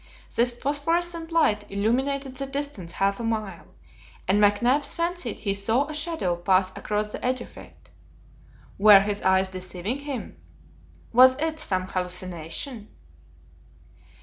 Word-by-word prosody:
This 240 Hz, +1 st, +3 dB
phosphorescent 330 Hz, +6 st, -1 dB
light 215 Hz, -11 st, +2 dB
illumined 255 Hz, +8 st, 0 dB
the 270 Hz, 0 st, -6 dB
distance 275 Hz, -11 st, -5 dB
half 195 Hz, +2 st, 0 dB
a -, -, -4 dB
mile, 215 Hz, -6 st, -3 dB, 0.6 s
and 205 Hz, +2 st, +3 dB
McNabbs 240 Hz, +8 st, +2 dB
fancied 350 Hz, +1 st, -1 dB
he 200 Hz, -3 st, -2 dB
saw 225 Hz, +7 st, +1 dB
a 305 Hz, -, -7 dB
shadow 300 Hz, -, -2 dB
pass 185 Hz, +1 st, +2 dB
across 210 Hz, 0 st, -2 dB
the -, -, -7 dB
edge 255 Hz, +1 st, 0 dB
of 240 Hz, -, -11 dB
it. -, -, -15 dB, 0.9 s
Were 205 Hz, -1 st, +8 dB
his 205 Hz, 0 st, -2 dB
eyes 190 Hz, 0 st, +3 dB
deceiving 185 Hz, +6 st, -5 dB
him? 280 Hz, -4 st, -6 dB, 0.8 s
Was 255 Hz, +3 st, +7 dB
it 315 Hz, 0 st, -1 dB
some 185 Hz, -10 st, 0 dB
hallucination? 185 Hz, -, -4 dB
225 Hz, 130 wpm, -25 LUFS, 195-280 Hz, 0.9 s, Were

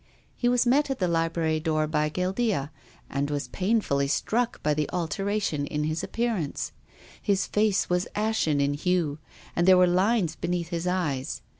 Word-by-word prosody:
He 245 Hz, -, +1 dB
was 245 Hz, 0 st, +3 dB
met 275 Hz, +4 st, +3 dB
at 270 Hz, -, -1 dB
the 180 Hz, -, 0 dB
library 165 Hz, -1 st, 0 dB
door 155 Hz, -1 st, 0 dB
by 150 Hz, 0 st, 0 dB
Guildea 185 Hz, -, -1 dB, 0.4 s
and 140 Hz, +1 st, -2 dB
was 145 Hz, -1 st, -3 dB
painfully 185 Hz, -9 st, +1 dB
struck 235 Hz, -, -1 dB
by 150 Hz, -, +2 dB
the 150 Hz, 0 st, -1 dB
alteration 180 Hz, -3 st, -1 dB
in 150 Hz, 0 st, -2 dB
his 155 Hz, +1 st, -2 dB
ap -, -, -7 dB
pearance. 225 Hz, -11 st, -1 dB, 0.5 s
His 200 Hz, -2 st, +1 dB
face 210 Hz, -2 st, +1 dB
was 180 Hz, 0 st, 0 dB
ashen 210 Hz, -9 st, +1 dB
in 140 Hz, 0 st, +2 dB
hue, 160 Hz, -1 st, 0 dB, 0.4 s
and 175 Hz, +1 st, +2 dB
there 185 Hz, -1 st, +8 dB
were 180 Hz, -, +6 dB
lines 185 Hz, -1 st, +2 dB
beneath 175 Hz, 0 st, -2 dB
his 170 Hz, 0 st, -3 dB
eyes. 155 Hz, -8 st, -2 dB
175 Hz, 170 wpm, -26 LUFS, 150-205 Hz, 0.5 s, there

